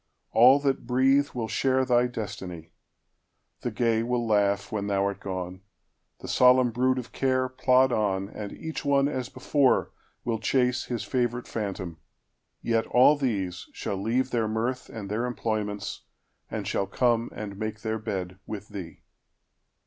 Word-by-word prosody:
All 125 +5 +7
that 135 -4 0
breatheWill 130 -1 +2
share 130 +2 +1
thy 125 -1 +3
destiny. 95 -8 -6 0.9
The - - -2
gay 115 0 +1
will 120 0 -1
laughWhen 100 0 +1
thou 100 -1 +1
art 100 -1 -2
gone, 95 -1 -5 0.6
the - - -7
solemn 125 -1 +5
brood 130 +2 +2
of 125 -2 -5
carePlod 130 0 +2
on, 100 -4 0
and 105 -1 -7
each 160 0 -6
one 140 -1 +3
as 130 -3 -3
before 130 +1 +2 0.3
will 115 -2 -1
chaseHis 125 -1 0
favorite 125 -1 -1
phantom; 95 -6 -4 0.6
yet 115 -1 +1
all 130 +4 +6
these 100 -11 -2
shall - - -3
leaveTheir 120 +1 0
mirth 120 +4 -2
and 105 -3 -7
their 110 +5 -1
employments, 105 -4 -3 0.5
and - - -4
shall 100 - 0
comeAnd 115 -2 -1
make 110 0 -4
their 110 0 -2
bed 95 -4 -4
with 105 -1 -6
thee. 95 -6 -8
115 Hz, 135 wpm, -27 LUFS, 100-125 Hz, 0.9 s, All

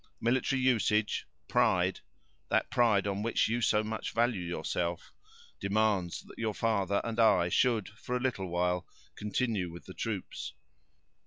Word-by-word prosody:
Military 130 +3 +1
usage—pride—that 110 -4 0
pride 110 -5 +3
on 100 0 -1
which 115 +2 +2
you 120 +2 0
so 105 -1 +3
much 110 0 -4
value 115 -4 +2
yourself, 85 0 -3 0.5
demands 100 -3 +1
that - - -14
your 110 -2 -1
father 100 -3 +1
and 115 0 -3
I 100 -6 +5
should 115 0 +2
for 115 +4 -4
a - - -3
little 120 -7 -1
while 90 +1 0 0.3
continue 105 -3 -1
with 85 - -11
the 95 - -9
troops. 105 -3 -4
105 Hz, 135 wpm, -31 LUFS, 95-115 Hz, 0.5 s, I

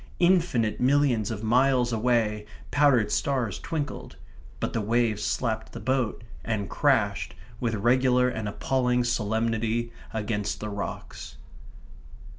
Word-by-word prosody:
Infinite 170 - +2
millions 130 -5 +3
of 110 -1 -5
miles 125 +1 +3
away 110 -2 +1 0.2
powdered 130 -8 +3
stars 125 -8 0
twinkled; 150 -4 -5 0.4
but - - -2
the 115 - 0
waves 110 0 +1
slapped 110 0 -2
the - - -6
boat, 125 0 -1 0.2
and 105 -4 -3
crashed, - - +1 0.2
with 115 -2 -1
regular 125 +3 +3
and 110 -4 -3
appalling 125 +2 0
solemnity, 115 0 0 0.2
against 105 -2 -2
the 105 - -4
rocks. 100 -1 -6
115 Hz, 115 wpm, -26 LUFS, 110-130 Hz, 0.4 s, millions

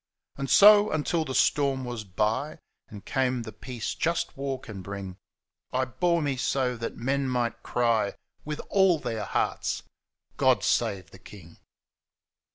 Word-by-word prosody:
And 135 -1 -4
so, 210 +1 +8
until 155 +1 0
the 130 -3 -4
storm 135 -1 +2
was 120 -3 -5
by. 110 - -1 0.3
And 105 -2 -11
came 130 -2 0
the 110 - -8
peace 115 +2 -5
jnst 170 +1 -1
war 135 -1 -3
can 110 -6 -9
bring, 95 -1 -7 0.5
I 130 +1 +1
bore 170 +5 0
me 140 -2 -1
so 125 -1 0
that 115 0 -5
men 135 +2 -1
might 120 -2 -1
ciy 115 -4 +1 0.3
With 150 0 -5
aU 190 -4 +5
their 115 -7 -4
hearts, - - -1 0.6
<Ood - - +4
Save 100 -8 0
the 95 - -14
King.' 90 -3 -14
125 Hz, 150 wpm, -27 LUFS, 110-140 Hz, 0.6 s, so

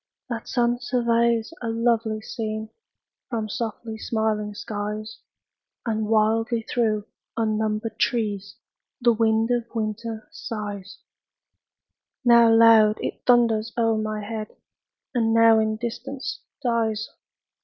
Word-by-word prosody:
That 230 -1 -4
sun 240 -1 +1
surveys 235 0 +1
a 230 - -2
lovely 225 -1 +1
scene 220 -1 -5 0.6
From 225 -3 -2
softly 220 0 -5
smiling 215 -2 -1
skies; 210 +1 -5 0.7
And 220 -2 -1
wildly 225 +1 +2
through 215 -3 0 0.3
unnumbered 215 0 -1
trees 205 -4 -1 0.4
The 240 -2 +4
wind 225 +1 +2
of 240 -1 0
winter 220 0 -3
sighs: 205 -4 -6 1.2
Now 235 -1 +7
loud, 225 -2 +6
it - - -4
thunders 230 -2 +3
o'er 225 -1 +3
my 215 -1 -3
head, 215 0 -6 0.6
And 225 -2 +2
now 230 -1 +6
in 220 0 +1
distance 245 +4 -5 0.2
dies. 225 -3 0
225 Hz, 110 wpm, -24 LUFS, 215-235 Hz, 1.2 s, Now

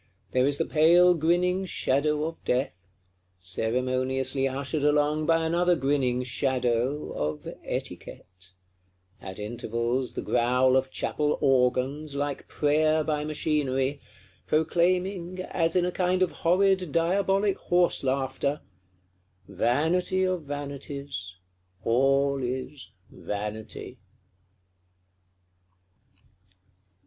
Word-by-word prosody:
There 130 +1 +2
is 145 0 +1
the 165 - 0
pale 175 +3 +5
grinning 175 +3 +1
Shadow 150 -2 0
of 165 +1 -5
Death, 125 -3 0 0.6
ceremoniously 130 +7 0
ushered 140 +2 -2
along 150 +1 +2
by 165 -1 +3
another 175 +2 +2
grinning 135 -4 0
Shadow, 125 +1 -1
of 75 0 -4 0.2
Etiquette: 90 0 -7 0.7
at 95 -1 -8
intervals 115 +3 -2
the - - -3
growl 125 +2 +2
of 130 0 +1
Chapel 150 +2 -1
Organs, 135 +3 +1
like 145 -1 -3
prayer 155 +1 +2
by 150 -1 -1
machinery; 145 -3 -1 0.5
proclaiming, 180 +3 0
as 165 -2 -1
in 180 -1 +3
a 180 - -1
kind 185 +1 +1
of 185 - 0
horrid 185 0 +2
diabolic 195 +4 +1
horse 175 -3 +2
laughter, 135 +2 -1 0.9
_Vanity 160 - +1
of 185 -2 -1
vanities, 140 -8 -6 0.5
all 135 +3 +2
is 130 -1 -5 0.2
Vanity! 105 +4 -6
140 Hz, 100 wpm, -27 LUFS, 130-165 Hz, 0.9 s, pale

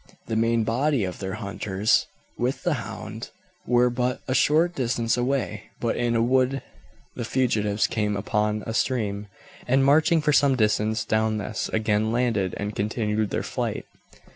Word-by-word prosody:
The 110 - -3
main 115 0 +2
body 125 +3 +1
of 90 -1 -4
their 95 0 -4
hunters, 100 0 0 0.3
with 125 +3 -2
the 175 - +2
hound, 110 -1 -7 0.4
were 125 0 +4
but 125 +1 -1
a 130 - 0
short 160 +6 +3
distance 120 -4 0
away, 120 -4 -1
but 115 - 0
in 120 -1 0
a 115 - +3
wood 130 +2 +2 0.5
the - - -4
fugitives 110 -4 +1
came 105 -2 -1
upon 105 +1 -1
a 110 - -4
stream, 105 -4 -1 0.4
and, 135 +2 +3
marching 155 +4 +4
for 150 -1 +1
some 135 -1 +4
distance 110 -1 +1
down 110 0 +1
this, 105 +1 -3
again 110 0 +1
landed, 115 -6 0
and 105 +1 -4
continued 105 0 -1
their - - -2
flight. - - -3
115 Hz, 160 wpm, -25 LUFS, 105-125 Hz, 0.5 s, were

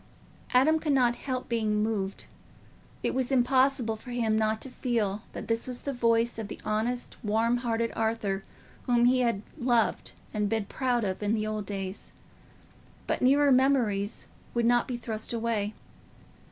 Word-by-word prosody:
Adam 300 +6 +4
could 305 -2 0
not 245 -3 +3
help 255 -1 -4
being 215 -3 +1
moved: 200 -3 -2 0.8
it - - 0
was 260 0 -1
impossible 255 -2 +3
for 220 +4 -12
him 230 -3 0
not 220 0 +1
to - - -5
feel 225 -6 -1
that - - -6
this 230 +1 -1
was 250 -1 -4
the 280 - -3
voice 230 -1 +2
of 220 - -4
the - - -8
honest 225 +4 -2
warm 225 +3 +2
hearted 230 -1 -1
Arthur 220 -3 -1 0.4
whom 240 -1 +4
he 255 +1 +4
had 235 -5 +1 0.2
loved 240 -3 +1 0.2
and 210 -1 0
been 220 -1 0
proud 245 +1 0
of 190 -1 -2
in 215 +1 0
old 215 -2 -3
days; 195 -1 -5 0.9
but - - -1
nearer 280 +2 +5
memories 245 -6 +2 0.3
would 235 -1 +2
not 240 0 +3
be 250 - -3
thrust 225 -1 -4
away. 225 -2 -1
230 Hz, 160 wpm, -28 LUFS, 215-250 Hz, 0.9 s, nearer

